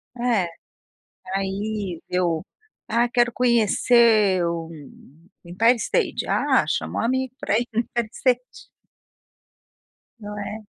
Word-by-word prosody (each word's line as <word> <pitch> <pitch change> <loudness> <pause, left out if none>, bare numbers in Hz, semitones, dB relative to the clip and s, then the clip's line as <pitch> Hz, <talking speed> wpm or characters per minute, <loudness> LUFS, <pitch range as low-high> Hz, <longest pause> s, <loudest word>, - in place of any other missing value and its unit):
É. 235 -7 +1 0.9
Aí, 195 -2 -3
eu 175 -3 0 0.5
"Ah, 235 +2 +2
quero 240 -1 +2
conhecer 225 -4 +3
o 165 -1 -3 0.8
Empire 225 +8 +3
State", - - -1
ah, - - +2
chama - - -2
o - - 0
amigo 260 +1 -1
pra 205 - +1
ir 240 - -3
no 225 - +1
Empire 235 -1 -2
State. 250 -1 -1 1.5
Não 210 -1 -8
é? 215 +1 -6
220 Hz, 110 wpm, -23 LUFS, 195-240 Hz, 1.5 s, conhecer